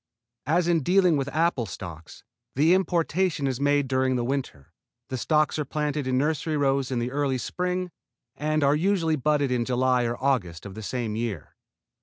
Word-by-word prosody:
As 170 +3 +2
in 170 -2 +3
dealing 180 +2 +3
with 140 -1 -1
apple 155 -5 0
stocks, 85 -3 -9 0.3
the 155 +6 +4
importation 180 -3 +1
is 130 -2 -1
made 145 -1 +2
during 130 0 +1
the 120 - 0
winter, 130 - -4 0.4
the 130 - -3
stocks 155 +3 +1
are - - +1
planted 150 -1 -2
in 130 0 +1
nursery 155 +2 0
rows 135 -2 +1
in 130 - -2
the 120 +1 -2
early 140 -1 0
spring, 180 +7 -2 0.4
and 155 0 0
are 140 +1 +4
usually 165 -1 +1
budded 145 -1 +1
in 125 -1 +1
July 125 0 +1
or 120 0 -2
August 105 -12 -1
of 100 - -7
the 110 - -8
same 115 0 -3
year. 110 -7 -4
140 Hz, 180 wpm, -26 LUFS, 125-155 Hz, 0.4 s, the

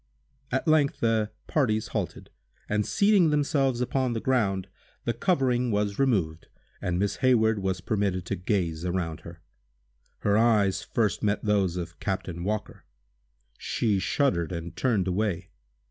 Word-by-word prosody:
At 130 +4 -1
length 155 -3 +3
the 110 -2 +1 0.2
parties 110 -8 0
halted, - - -4 0.4
and, 105 0 0
seating 200 -5 +4
themselves 140 -4 +1
upon 130 0 0
the 115 - -1
ground, 100 -7 0 0.4
the 120 - +1
covering 125 - +1
was 105 -1 -1
removed, 95 -12 +1 0.3
and 90 -1 -1
Miss 100 +2 0
Hayward 110 -5 +3
was 95 -1 -2
permitted 95 -3 -1
to - - -2
gaze 85 -3 -1
around 85 -3 -2
her. 85 0 -12 0.8
Her 100 +1 +3
eyes 105 -4 +3
first 110 -4 -1
met 105 +1 0
those 100 -4 +1
of 85 -1 -6
Captain 90 -3 -3
Walker. 105 +2 -3 0.8
She 105 -4 0
shuddered, 95 - +1
and 85 -1 -6
turned 110 -8 +1
away. 95 -1 -1
105 Hz, 140 wpm, -27 LUFS, 90-125 Hz, 0.8 s, seating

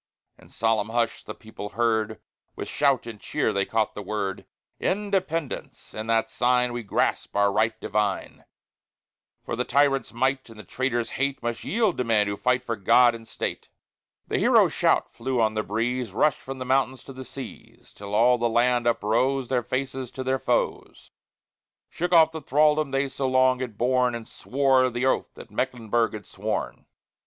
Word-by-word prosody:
In - - -18
solemn 110 -1 0
hush 115 0 -1
the - - -8
people 110 -2 -9
heard; 110 -2 +1 0.4
With - - -6
shout 140 -4 +1
and 115 -3 -8
cheer - - -1
they 100 0 0
caught 110 -2 0
the 105 - -6
word: 100 -1 -4 0.3
Independence! 185 -7 -2
In 110 +1 -5
that 115 0 +2
sign 125 0 +2
We 120 - -3
grasp 100 - -1
our 100 0 +3
right 110 +2 +1
divine; 105 -1 -2 1.0
For - - -3
the - - 0
tyrant's 140 0 +2
might 130 +2 -1
and 115 - -13
the - - -8
traitor's 120 -3 -2
hate 140 0 -1
Must 120 -1 -3
yield 215 - 0
to - - +2
men 110 -3 +2
who 100 0 -2
fight 125 +4 +1
for 115 -2 -2
God 120 +4 +5
and 115 -1 -10
State! - - -5 0.6
The - - 0
hero - - +5
shout - - +1
flew 130 +1 -2
on 110 -1 +2
the 110 - 0
breeze; 115 +1 -2
Rushed 150 +7 +2
from 135 0 -7
the 130 - -5
mountains 130 -1 +1
to 135 - -10
the 130 0 -8
seas; 130 +1 -11
Till 100 0 -6
all 120 +3 +4
the 120 0 +1
land 120 +1 +2
uprose, 120 +4 +1
Their 125 -2 +1
faces 130 +1 -3
to 130 - -5
their 130 0 0
foes, - - -2 0.8
Shook 175 +1 -2
off 160 -2 +6
the 160 -1 -6
thraldom 150 +1 +3
they 135 +1 0
so 135 0 -3
long 130 0 +3
had 120 -5 -5
borne, 125 0 +2
And 115 -1 -7
swore 130 -1 +2
the 120 +1 -2
oath 130 - +1
that - - -12
Mecklenburg 120 -3 0
had 105 -3 -7
sworn! - - -4
125 Hz, 180 wpm, -25 LUFS, 115-135 Hz, 1.0 s, off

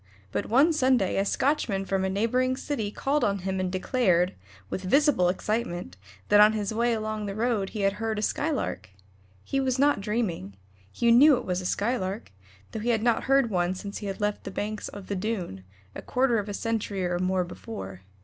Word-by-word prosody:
But - - -2
one 280 +9 +4
Sunday 255 -10 +2
a - - +3
Scotchman 205 -4 0
from 195 0 0
a 190 - 0
neighboring 250 +6 +1
city 245 -8 -3
called 280 +7 -1
on 200 -1 +1
him 190 -1 -1
and 185 -1 -1
declared, 185 -3 +1 0.3
with 185 - -4
visible 230 - +3
excitement, 180 - -2 0.3
that 205 - +6
on 210 +1 +7
his 210 -1 -2
way 235 +2 +1
along 215 -1 -3
the 195 - -4
road 220 -3 0
he 215 - -5
had 195 0 +2
heard 220 -1 -1
a 210 - -2
Skylark. 290 - -2 0.5
He 275 - -1
was 260 -1 0
not 285 -5 +3
dreaming; 195 - -2 0.4
he 235 0 +2
knew 270 +4 +7
it 245 - -6
was 180 0 -1
a 180 - -3
Skylark, 205 - -2 0.4
though - - -4
he 230 +3 -2
had 225 -2 +1
not 235 -1 +2
heard 270 -3 +3
one 180 -1 0
since 200 +2 -6
he 205 - -5
had 195 - -4
left 205 0 -1
the - - -5
banks 210 +2 -4
of 200 -1 -9
the 200 - -3
Doon, 185 - -3 0.3
a - - -7
quarter 250 -3 +1
of 205 0 -5
a - - -3
century 210 -4 -2
or 175 0 -1
more 185 0 +1
before. 95 - -8
210 Hz, 205 wpm, -27 LUFS, 190-240 Hz, 0.5 s, on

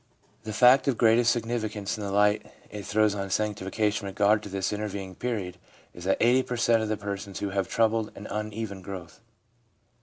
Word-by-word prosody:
The 110 - -4
fact 125 +6 +5
of 130 -4 +2
greatest 115 +1 +4
significance 110 -3 -2
in 105 - -6
the 100 - -3
light 105 +1 +2 0.2
it 105 -2 -7
throws 105 0 +3
on 100 -1 -4
sanctification 105 0 -1
in 95 - -6
regard 105 +1 +3
to 105 - -8
this 95 +1 -2
intervening 100 -2 -4
period 95 -5 -4 0.3
is 85 - -10
that 95 - +2
80 125 +2 +4
per 125 -1 -4
cent, 115 0 +3
of 110 - -2
the 110 - -1
persons 100 -1 -5
have 100 -1 -3
a - - -21
troubled 110 -1 +1
and 105 - -9
uneven 105 -2 -4
growth. 90 -1 -9
105 Hz, 190 wpm, -27 LUFS, 100-115 Hz, 0.3 s, fact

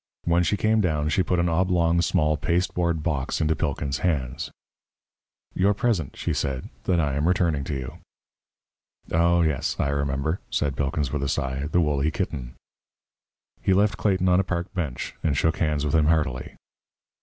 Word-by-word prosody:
When 85 +1 +3
she 90 +4 +1
came 110 +2 +2
down, 75 -5 0
she 95 - +2
put 90 0 0
an 85 0 +2
oblong 85 -1 +2
small 75 -4 +2
pasteboard 85 -1 0
box 70 -5 -1
into 80 0 +2
Pilkins' 70 -3 -2
hands. 75 -3 -1 1.0
"Your 100 +2 +2
present," 100 - 0
she - - -1
said, 65 -2 -2 0.2
"that 90 -2 +2
I 75 -4 +1
am 75 +4 0
returning 85 -6 +1
to 70 - -3
you." 65 -2 -6 1.1
"Oh, 85 +1 +3
yes, 75 -5 0
I - - +1
remember," 70 +3 -1
said 70 -3 -1
Pilkins, 70 0 -1
with 75 - -1
a 70 - -1
sigh, 70 0 -2
"the 90 - +3
woolly 75 -1 +1
kitten." 70 -7 -4 1.1
He 95 - +2
left 100 -1 +2
Clayton 95 -2 +1
on 90 0 +4
a - - +3
park 90 -1 -3
bench, 75 -9 -3
and 75 -5 0
shook 80 +1 +1
hands 75 -2 0
with 75 - -1
him 80 -2 +4
heartily. 75 -6 0
80 Hz, 170 wpm, -25 LUFS, 70-90 Hz, 1.1 s, on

